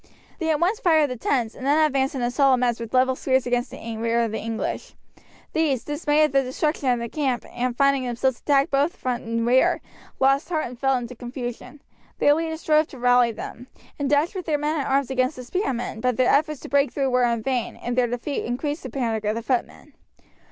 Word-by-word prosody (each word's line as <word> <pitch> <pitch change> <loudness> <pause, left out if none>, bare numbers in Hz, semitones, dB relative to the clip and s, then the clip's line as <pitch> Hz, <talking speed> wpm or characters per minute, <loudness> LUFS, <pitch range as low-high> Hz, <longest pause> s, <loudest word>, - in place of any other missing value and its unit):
They 325 -2 -1
at 305 -2 +2
once 370 +6 +1
fired 315 -5 +3
the - - -3
tents, 235 -1 -1
and - - -11
then 285 +3 +3
advanced 270 -1 0
in 255 - -2
a 240 - 0
solid 270 0 +4
mass 245 -2 0
with 230 -1 -6
level 260 0 +3
spears 260 0 +1
against 245 0 0
the 225 -1 -7
rear 230 +1 +1
of 230 -2 -1
the 220 - -3
English. 225 +1 -4 0.6
These, 295 -6 +1
dismayed 295 0 +1
at 305 - +2
the 275 - +4
destruction 270 +2 -1
of 245 - +3
their 235 0 -4
camp, 265 -2 -2
and 250 +1 -2
at - - -29
finding 275 -1 +3
themselves 245 +1 -1
attacked 280 +2 +2
both 285 +4 +1
front 250 -1 -3
and 230 0 -2
rear, 255 +2 +3 0.4
lost 275 +4 +2
heart 315 -3 0
and 245 0 -9
fell 270 0 +2
into 245 0 -6
confusion. 245 +3 -7 0.3
Their 290 - +5
leaders 320 +1 -2
strove 305 0 +3
to 270 - -12
rally 245 -1 +4
them, 240 +2 -8 0.3
and 285 -1 -1
dashed 295 +5 +2
with 370 -3 -6
their 305 -2 +2
men 300 +2 -1
at 275 - -2
arms 270 0 +1
against 255 +2 +1
the 255 - -8
spearmen, 250 - -3
but 250 -1 0
their 255 -1 +3
efforts 305 0 +1
to - - -9
break 280 0 +2
through 270 -2 -1
were 250 0 +3
in 235 -2 +1
vain, 250 -2 -1
and 240 0 -4
their 250 -1 +3
defeat 245 +4 -3
increased 290 +6 -3
the 260 - -7
panic 225 -4 -2
of 210 +1 0
the 230 - -4
footmen. 255 0 -3
260 Hz, 230 wpm, -24 LUFS, 245-290 Hz, 0.6 s, Their